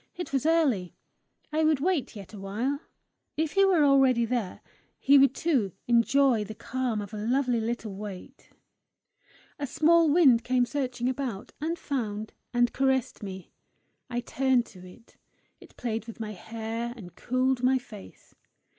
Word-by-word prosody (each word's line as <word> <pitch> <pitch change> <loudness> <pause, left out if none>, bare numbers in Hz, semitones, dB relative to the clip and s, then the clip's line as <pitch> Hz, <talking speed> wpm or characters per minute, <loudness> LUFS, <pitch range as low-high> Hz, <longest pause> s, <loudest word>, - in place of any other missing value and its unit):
It 355 -5 -6
was 275 +3 +1
early; 275 - +1 0.6
I 315 +1 +2
would 310 -3 +3
wait 320 -5 -1
yet 200 0 -10
a 205 - -8
while! 225 +9 -2 0.6
If 315 -1 0
he 390 - +4
were 360 -6 +4
already 265 -4 +4
there, 230 -5 -3 0.4
he 275 0 +6
too 275 0 0
would 195 -3 -7
enjoy 240 0 +3
the 215 +1 -8
calm 235 -2 -2
of 205 - -11
a - - -4
lovely 250 0 +1
little 225 -2 -3
wait. 200 -2 -9 1.1
A 285 - -2
small 320 +3 +4
wind 280 -7 +5
came 250 0 +2
searching 250 -2 -2
about, 255 -6 -4
and 330 +3 -2
found, 220 -8 -4 0.2
and 240 -1 +2
caressed 265 -2 0
me. 190 -3 -8 0.6
I 240 0 -2
turned 255 -1 +1
to 185 - -13
it; 185 +5 -16 0.4
it - - -18
played 225 -2 -3
with 230 - -9
my 215 -1 -4
hair, 225 +4 -5
and 180 -6 -11
cooled 255 0 0
my 260 +1 +3
face. 220 -6 -12
245 Hz, 155 wpm, -27 LUFS, 220-275 Hz, 1.1 s, he